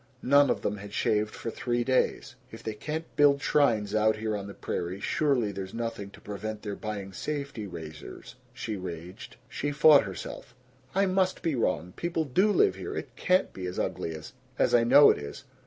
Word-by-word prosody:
None 140 +2 +5
of - - 0
them 105 - -1
had 100 +1 -10
shaved 105 0 +1
for 115 - -5
three 120 +1 -1
days. 130 +1 0 0.2
"If - - -11
they 110 - -3
can't 155 +9 -4
build 145 -1 +5
shrines, 110 -9 +2
out 110 0 +3
here 110 0 -2
on 100 -1 -5
the 100 - -9
prairie, 90 +2 -4
surely 135 -4 +1
there's 95 0 -6
nothing 115 -3 -4
to - - -15
prevent 105 +1 -6
their 105 -2 -4
buying 100 -3 -6
safety 140 -3 -4
razors!" 80 -4 -9 0.2
she 110 -2 -5
raged. 90 +2 -8
She 145 +4 -3
fought 150 -3 +6
herself: 100 +4 -8 0.4
"I 195 +1 +4
must 185 0 +1
be 165 - +1
wrong. 90 - -1
People 170 -2 -1
do 185 +10 +3
live 405 - +4
here. - - -5
It - - -6
CAN'T 185 +1 +2
be 90 -1 -5
as 90 - -6
ugly 80 - -2
as 80 0 -10 0.2
as - - +2
I 120 - +6
know 140 +5 +8
it - - -2
is! 70 - -8
110 Hz, 195 wpm, -28 LUFS, 100-145 Hz, 0.4 s, know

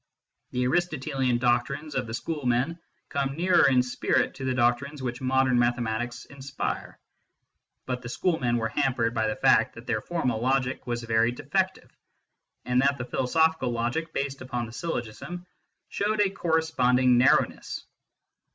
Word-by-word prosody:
The 125 - -1
Aristotelian 135 -5 0
doctrines 130 +5 0
of 130 -3 -2
the 110 - -4
schoolmen 140 +2 -1 0.3
come 140 -1 -1
nearer 175 -3 +5
in 125 -2 +4
spirit 125 - 0
to 135 - -6
the 130 -1 0
doctrines 130 +4 0
which 120 0 -4
modern 130 -1 +2
mathematics 120 0 -1
inspire; 140 0 -5 0.9
but 125 -1 -3
the 120 - -7
schoolmen 130 -6 0
were 115 -1 -1
hampered 125 -3 0
by 110 -2 0
the 110 - -1
fact - - +3
that - - -11
their 110 - -1
formal 130 -10 -1
logic 130 0 0
was 120 -1 -2
very 115 0 +2
defective, 120 - -2 0.7
and 125 0 +2
that 140 +1 +2
the 125 - -4
philosophical 160 +2 +1
logic 120 +8 -2
based 140 -1 -3
upon 125 -2 -3
the 115 - -10
syllogism 170 +4 -5 0.4
showed 210 +1 -1
a 200 -2 +3
corresponding 130 -9 +2
narrowness. 130 - +2
130 Hz, 145 wpm, -27 LUFS, 120-140 Hz, 0.9 s, nearer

